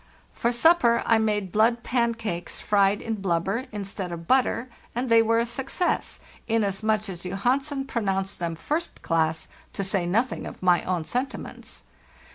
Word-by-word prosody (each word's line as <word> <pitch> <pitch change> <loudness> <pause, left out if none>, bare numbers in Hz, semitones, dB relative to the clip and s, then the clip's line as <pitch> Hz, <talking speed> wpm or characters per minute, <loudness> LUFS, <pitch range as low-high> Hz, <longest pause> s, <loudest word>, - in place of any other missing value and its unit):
For 235 - 0
sup 325 +8 +5
per 235 -6 +3
I 225 -1 +4
made 210 -4 0
blood 230 +3 +3
pancakes 230 -8 -1
fried 200 -1 +2
in 220 -3 -3
blubber 190 +6 0
instead 195 -3 -5
of 170 -1 -7
butter, 255 -1 +2 0.3
and 250 +1 -1
they 230 0 +7
were 225 0 +2
a 230 - +2
success, 270 +9 -1 0.3
inasmuch 215 0 +1
as 180 -3 -7
Johansen 265 +9 -1
pronounced 195 -7 -2
them 170 -1 -2
'first 310 - -3
class,' 160 -1 0 0.3
to 195 - -2
say 190 -2 0
nothing 230 +8 0
of - - -10
my 180 -1 +4
own 180 -3 -1
sentiments. 255 - -5
220 Hz, 155 wpm, -25 LUFS, 190-240 Hz, 0.3 s, they